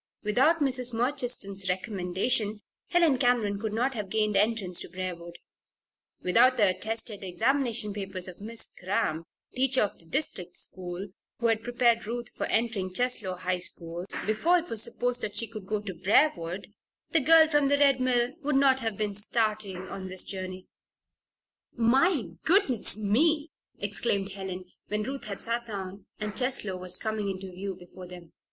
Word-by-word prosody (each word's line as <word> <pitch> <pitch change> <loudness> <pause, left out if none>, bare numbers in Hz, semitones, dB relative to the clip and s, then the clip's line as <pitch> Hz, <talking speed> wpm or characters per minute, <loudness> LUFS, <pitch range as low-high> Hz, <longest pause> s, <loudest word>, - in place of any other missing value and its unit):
Without 265 +10 +3
Mrs. 255 -3 0
Murchiston's 235 -6 -1
recommendation 200 +3 0 0.3
Helen 335 -7 +3
Cameron 235 -5 +2
could 220 0 -3
not 245 +5 0
have 210 -5 -4
gained 215 0 +1
entrance 200 -3 +2
to - - -4
Briarwood; 175 -2 -6 0.9
without 240 +8 +5
the 210 - +5
attested 215 +2 -2
examination 230 +2 0
papers 195 -2 -2
of 185 +1 -9
Miss 225 +2 -4
Cramp, 170 -4 -1 0.3
teacher 260 -1 +2
of 205 - -4
the 165 - -15
district 180 - -2
school, 185 +1 -4 0.3
who 235 - -4
had 225 -1 +3
prepared 240 -1 +2
Ruth 240 +1 -4
for - - -2
entering 220 -5 0
Cheslow 220 -3 0
High 180 0 -1
School 175 0 -3 0.2
before 315 - +3
it 345 0 -4
was 225 -2 +2
supposed 245 +1 -1
that 205 - -2
she 230 - +2
could 215 -3 -9
go 215 0 -1
to 200 -2 -5
Briarwood, 185 - +1 0.4
the 325 - +4
girl 320 +3 +7
from 295 -2 +3
the 285 +1 +3
Red 275 -2 +4
Mill 250 0 +2
would 295 -1 0
not 270 -1 +4
have 225 -5 -3
been 210 -1 -1
starting 210 -3 -1
on 190 0 -6
this 185 0 0
journey. 185 -1 -6 1.1
"My 265 +6 +3 0.2
goodness 300 - +4
me!" 295 +9 +2 0.3
exclaimed 200 -1 0
Helen, 190 -1 -5 0.2
when 210 0 -1
Ruth 270 +4 -5
had 200 -2 -4
sat 235 +1 -1
down 195 -2 -6
and 210 -2 -4
Cheslow 250 -7 +1
was 180 0 0
coming 215 -1 -2
into 190 0 -5
view 190 +1 -5
before 180 0 -12
them. 175 -2 -12
215 Hz, 160 wpm, -28 LUFS, 190-245 Hz, 1.1 s, girl